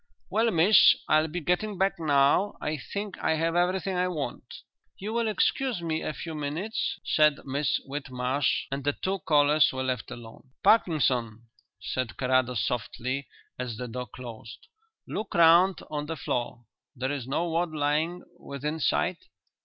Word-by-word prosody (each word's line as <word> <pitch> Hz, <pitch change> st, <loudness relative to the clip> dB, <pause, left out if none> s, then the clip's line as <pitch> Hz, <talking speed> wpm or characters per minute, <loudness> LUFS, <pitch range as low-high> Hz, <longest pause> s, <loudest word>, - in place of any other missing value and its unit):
"Well, 225 Hz, +2 st, +3 dB
miss, 185 Hz, +3 st, +6 dB
I'll 155 Hz, +1 st, +3 dB
be 175 Hz, +3 st, -4 dB
getting 185 Hz, +5 st, -1 dB
back 195 Hz, -1 st, +1 dB
now. 145 Hz, +5 st, +3 dB
I 150 Hz, +1 st, -2 dB
think 200 Hz, +8 st, -6 dB
I 160 Hz, -, +1 dB
have 165 Hz, +1 st, 0 dB
everything 185 Hz, +2 st, +1 dB
I 180 Hz, 0 st, +1 dB
want." 150 Hz, -8 st, -5 dB, 0.3 s
"You 210 Hz, +3 st, -5 dB
will 235 Hz, -1 st, +1 dB
excuse 245 Hz, +1 st, 0 dB
me 160 Hz, -1 st, -1 dB
a -, -, -2 dB
few 160 Hz, +3 st, -7 dB
minutes?" 155 Hz, +9 st, -3 dB
said 150 Hz, -1 st, +4 dB
Miss 140 Hz, +2 st, 0 dB
Whitmarsh, 135 Hz, -1 st, -1 dB
and 135 Hz, 0 st, -3 dB
the 145 Hz, +1 st, +1 dB
two 190 Hz, +5 st, -2 dB
callers 150 Hz, -1 st, +4 dB
were 130 Hz, 0 st, -3 dB
left 130 Hz, -3 st, -2 dB
alone. 120 Hz, +3 st, -11 dB
"Parkinson," 125 Hz, -, +2 dB, 0.4 s
said 130 Hz, -3 st, -4 dB
Carrados 125 Hz, -2 st, +1 dB
softly, 125 Hz, +3 st, -3 dB, 0.3 s
as 120 Hz, -3 st, -4 dB
the 125 Hz, -, -5 dB
door 125 Hz, +2 st, -5 dB
closed, 120 Hz, -2 st, -10 dB, 0.4 s
"look 215 Hz, -, -5 dB
round 170 Hz, +2 st, +5 dB
on 150 Hz, -1 st, -3 dB
the 165 Hz, -, -3 dB
floor. 120 Hz, -2 st, -3 dB, 0.3 s
There 130 Hz, +2 st, -2 dB
is 135 Hz, -4 st, -4 dB
no 160 Hz, +6 st, -1 dB
wad 170 Hz, +1 st, 0 dB
lying 155 Hz, +4 st, -1 dB, 0.2 s
within 150 Hz, +3 st, -4 dB
sight?" -, -, +1 dB
150 Hz, 155 wpm, -27 LUFS, 130-175 Hz, 0.4 s, miss